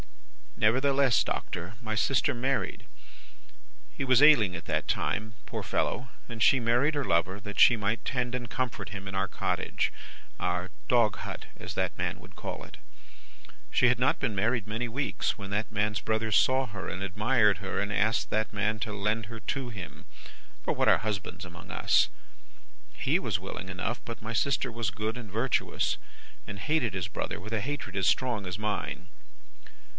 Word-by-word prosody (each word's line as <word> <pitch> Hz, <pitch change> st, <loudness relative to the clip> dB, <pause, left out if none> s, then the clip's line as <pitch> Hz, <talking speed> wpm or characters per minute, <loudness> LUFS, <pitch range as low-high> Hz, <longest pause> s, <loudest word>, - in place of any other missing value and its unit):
"'Nevertheless, 135 Hz, +3 st, +4 dB
Doctor, 90 Hz, +5 st, -4 dB
my 110 Hz, -2 st, -3 dB
sister 135 Hz, +5 st, +2 dB
married. 130 Hz, +3 st, -1 dB, 1.1 s
He -, -, -2 dB
was 130 Hz, -1 st, +5 dB
ailing 120 Hz, -12 st, +7 dB
at 85 Hz, +2 st, -7 dB
that 80 Hz, -2 st, -1 dB
time, 110 Hz, +1 st, -1 dB
poor -, -, -4 dB
fellow, 125 Hz, 0 st, -1 dB, 0.2 s
and 115 Hz, -2 st, -7 dB
she 130 Hz, +4 st, +6 dB
married 120 Hz, +6 st, +3 dB
her 145 Hz, -, +1 dB
lover, 95 Hz, -1 st, +1 dB
that 105 Hz, 0 st, -6 dB
she 120 Hz, -, +8 dB
might 105 Hz, +2 st, -1 dB
tend 125 Hz, -1 st, -1 dB
and 120 Hz, -2 st, -4 dB
comfort 120 Hz, -7 st, -3 dB
him 100 Hz, -1 st, -7 dB
in 95 Hz, -, -5 dB
our 95 Hz, 0 st, +1 dB
cottage -, -, -1 dB, 0.5 s
our 90 Hz, +1 st, -1 dB, 0.2 s
dog 115 Hz, -4 st, +4 dB
hut, -, -, -6 dB
as -, -, -7 dB
that -, -, -1 dB
man -, -, -2 dB
would -, -, -15 dB
call -, -, -5 dB
it. -, -, -12 dB, 0.9 s
She 125 Hz, -, +4 dB
had 125 Hz, -1 st, +4 dB
not 130 Hz, +2 st, +3 dB
been 120 Hz, -7 st, -1 dB
married 110 Hz, +2 st, +1 dB
many 110 Hz, +3 st, -2 dB
weeks, 135 Hz, +5 st, -1 dB
when 100 Hz, -2 st, -7 dB
that 105 Hz, +2 st, -1 dB
man's 105 Hz, 0 st, 0 dB
brother 110 Hz, 0 st, 0 dB
saw 130 Hz, +4 st, +4 dB
her 100 Hz, -4 st, -6 dB
and 95 Hz, -, -4 dB
admired 105 Hz, +2 st, +3 dB
her, 95 Hz, -1 st, -3 dB
and 100 Hz, 0 st, -1 dB
asked 110 Hz, +1 st, +2 dB
that 110 Hz, 0 st, 0 dB
man 110 Hz, +2 st, 0 dB
to 110 Hz, 0 st, -3 dB
lend 105 Hz, +2 st, -1 dB
her 115 Hz, 0 st, -7 dB
to 130 Hz, +4 st, -3 dB
him 100 Hz, -6 st, -8 dB, 0.6 s
for -, -, +1 dB
what -, -, +1 dB
are -, -, +7 dB
husbands 100 Hz, -2 st, -3 dB
among 90 Hz, +2 st, -11 dB
us! -, -, +4 dB, 0.8 s
He -, -, +1 dB
was -, -, -1 dB
willing 95 Hz, -, -6 dB
enough, 95 Hz, +6 st, -2 dB
but 115 Hz, -1 st, -7 dB
my 110 Hz, +2 st, -4 dB
sister 135 Hz, +1 st, +1 dB
was 115 Hz, -2 st, -1 dB
good 110 Hz, +2 st, -2 dB
and 110 Hz, -5 st, -8 dB
virtuous, 115 Hz, +5 st, +1 dB, 0.5 s
and 100 Hz, -, -6 dB
hated 150 Hz, -, +1 dB
his 90 Hz, -2 st, -2 dB
brother 95 Hz, -, -4 dB
with 110 Hz, +4 st, -7 dB
a 110 Hz, -, +1 dB
hatred 135 Hz, -6 st, -4 dB
as 95 Hz, -2 st, +2 dB
strong 120 Hz, -6 st, +1 dB
as 90 Hz, 0 st, -3 dB
mine. 105 Hz, -4 st, -3 dB
110 Hz, 180 wpm, -29 LUFS, 100-125 Hz, 1.1 s, she